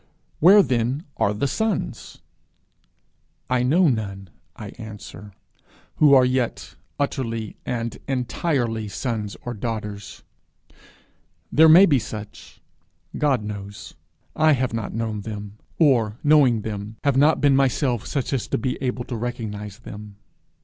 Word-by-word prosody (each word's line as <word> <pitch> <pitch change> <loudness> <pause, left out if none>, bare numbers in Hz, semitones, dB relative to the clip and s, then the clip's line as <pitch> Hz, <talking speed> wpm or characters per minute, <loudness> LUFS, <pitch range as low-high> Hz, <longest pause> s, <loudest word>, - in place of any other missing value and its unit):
Where 195 +5 +7
then 125 +4 -1
are 100 - +2
the 105 +7 -2
sons? 215 +9 -3 1.3
I 125 -1 +2
know 160 +9 +3
none, 100 - -3 0.2
I 105 - -8
answer, 105 -1 -10 0.7
who 145 -2 +6
are 130 -1 +6
yet 125 -2 -2 0.3
utterly 115 -6 -3
and 115 -1 -3
entirely 125 -4 -1
sons 105 -1 -4
or 120 - -3
daughters. 105 -3 -6 1.3
There 160 +2 +6
may 175 +5 +9
be 145 -8 +3
such 105 -2 -9 0.5
God 135 -7 +1
knows; 100 -1 -8 0.4
I 155 0 +4
have 130 -3 -1
not 115 -2 -3
known 110 -2 -3
them; 105 0 -8 0.2
or, 120 -9 +3
knowing 140 -7 +4
them, 105 0 -6
have 140 -3 +2
not 145 +4 +4
been 140 -1 +4
myself 130 -3 +1
such 140 -1 -2
as 130 - -1
to - - -1
be 125 +3 -3
able 125 -2 -2
to 120 - -6
recognize 110 -3 -5
them. 105 -3 -10
120 Hz, 130 wpm, -23 LUFS, 105-135 Hz, 1.3 s, may